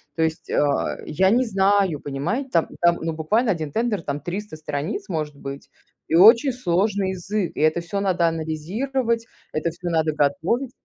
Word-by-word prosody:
То 160 - -2
есть, 160 0 -3
а, 145 -1 +1
я 190 +5 +2
не 250 +3 +3
знаю, 195 - +2
понимае 155 - -3
Там 165 -8 +2
там 170 0 +4
ну 165 0 -2
буквально 210 +10 +1
один 160 -5 -3
тендер, 225 0 0
там 145 -1 -3
300 190 -1 -5
страниц 155 +7 -4
может 155 -4 -3
быть 140 0 -8 0.4
и 160 - +1
очень 230 - +7
сложный 200 -3 0
язык, 190 0 -2
и - - -3
это 155 +2 +3
всё 185 +4 -3
надо 185 -4 +2
анализировать, 220 - -2 0.3
это 155 +2 0
всё 175 +2 -6
надо 160 -2 +1
готовить. 155 - 0
175 Hz, 170 wpm, -23 LUFS, 155-210 Hz, 0.4 s, очень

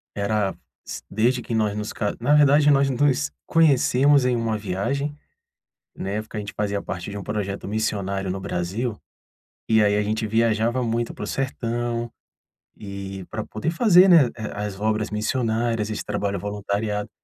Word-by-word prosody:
era 100 -1 0 0.3
s - - -6
desde 120 +4 +1
que 115 - -5
nós 105 -2 +1
nos 105 0 -3
ca 105 -2 -2
na 140 +5 +2
verdade 145 0 +5
nós 140 0 +4
nos 140 +2 +1
conhecemos 140 -3 +4
em 125 -1 +2
uma 115 -2 -1
viagem. 135 +10 -2 0.8
Na 95 - -5
época 110 +1 -4
a - - -1
gente 105 0 -6
fazia 100 -1 -1
parte 95 +1 -5
de 100 0 -5
projeto 100 -2 -4
missionário 100 -3 -2
no 95 - -3
Brasil, 95 +5 -3 0.7
e 110 -1 +4
aí 105 0 +3
a 105 - +1
gente 110 +1 -1
viajava 115 +2 +1
muito 115 0 -1
para - - -7
o - - -4
sertão. 120 -3 -2 0.7
E, 100 -2 -7
pra 110 0 -3
poder 150 +10 -3
fazer, 185 -1 +6
né, 165 -7 +7
eh, 110 -2 -5
as 105 -1 -4
obras 110 0 0
missionárias, 115 -1 -1
esse 110 - -3
trabalho 100 -1 -2
voluntariado. 105 +1 -2
110 Hz, 165 wpm, -23 LUFS, 105-125 Hz, 0.8 s, né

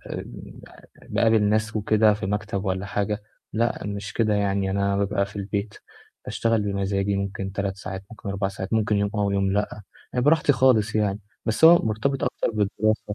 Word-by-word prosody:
آمم - - -8 0.5
باقابل 110 -2 +3
ناس 110 +1 +1
وكده 110 0 +3
في 100 - -4
مكتب 105 0 -2
والّا 95 +1 -2
حاجة. 105 +1 -2 0.3
لأ، 115 +1 0
مش 100 0 -5
كده 110 -2 +1
يعني، 100 -1 0
أنا 100 0 +1
بابقى 100 0 0
في 100 - -12
البيت، 100 +1 -3 0.5
باشتغل 115 -2 0
بمزاجي، 100 0 -1
ممكن 100 0 -3
3 100 -1 -2
ساعات، 95 -1 -6
ممكن 110 -3 -9
4 100 0 -1
ساعات، 95 0 -6
ممكن 110 -1 +2
يوم 100 0 +1
آه 105 -1 +1
ويوم 100 -1 +1
لأ، 105 +1 -2 0.3
يعني 125 -1 0
براحتي 150 0 +4
خالص 120 -5 +3
يعني. 105 -1 0 0.2
بس 115 +7 +2
هو 170 +1 +9
مرتبط 120 +6 -1
أكتر - - -1
بالدراسة 110 0 0
105 Hz, 175 wpm, -24 LUFS, 100-110 Hz, 0.5 s, هو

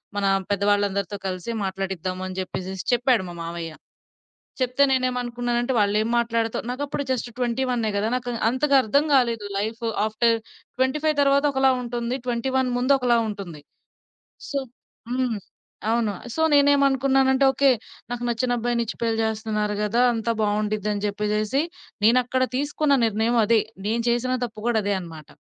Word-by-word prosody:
మన 200 - 0 0.2
పెద్ద 200 -1 0
వాళ్ళందరితో 200 -1 0
కలిసి 185 +4 -4
మాట్లాడిద్దాము 190 -1 -3
అని 185 0 -6
జెప్పేసేసి 185 0 -5
చెప్పాడు 245 -2 +3
మా - - -7
మామయ్య. 165 -1 -5 0.9
చెప్తే 255 +2 +2
నేనేమనుకున్నానంటే 245 -1 0
వాళ్ళు 205 0 +2
ఏమి 225 - -1
మాట్లాడతా 230 -1 0
నాకప్పుడు 280 +3 -3
జస్ట్ 250 -1 -2
ట్వెంటీ 245 +1 0
వన్నే 235 -3 0
గదా! 205 +2 0
నాకు 245 -1 -3 0.2
అంతగా 275 +4 +1
అర్థం 280 +7 +2
గాలేదు 235 -5 +2
లైఫ్ 220 +4 -3 0.2
ఆఫ్టర్ 230 +2 +2 0.4
25 300 +4 +1
తరువాత 280 +1 +3
ఒకలా 265 0 +4
ఉంటుంది. 240 +1 -3
21 255 +2 0
ముందు 255 +3 +3
ఒకలా 245 -2 +3
ఉంటుంది. 190 -7 -7 0.9
సో 280 - -1 0.5
హ్మ్. 250 -4 0 0.5
అవును 230 -2 +1 0.2
సో 320 - -1
నేనేమనుకున్నానంటే 275 -1 +4
ఓకే. 275 +1 +3 0.4
నాకు 245 0 -4
నచ్చిన 245 +1 0
అబ్బాయినిచ్చి 235 -1 -1
పెళ్లి 225 -1 0
జేస్తున్నారు 215 -1 -1
కదా! 230 +4 +2
అంతా 230 0 -1
బావుండిద్దని 210 0 -1
జెప్పేసేసి 210 +6 0 0.4
నేనక్కడ 250 +2 +3
తీసుకున్న 290 +1 +1
నిర్ణయం 225 +2 +1
అది. 225 0 +4 0.3
నేను 230 +2 0
చేసిన 250 +2 +1
తప్పు 215 -2 -10
గూడా 230 -2 +2
అదే 205 0 0
అనమాట. 160 -3 -10
235 Hz, 140 wpm, -24 LUFS, 210-255 Hz, 0.9 s, ఒకలా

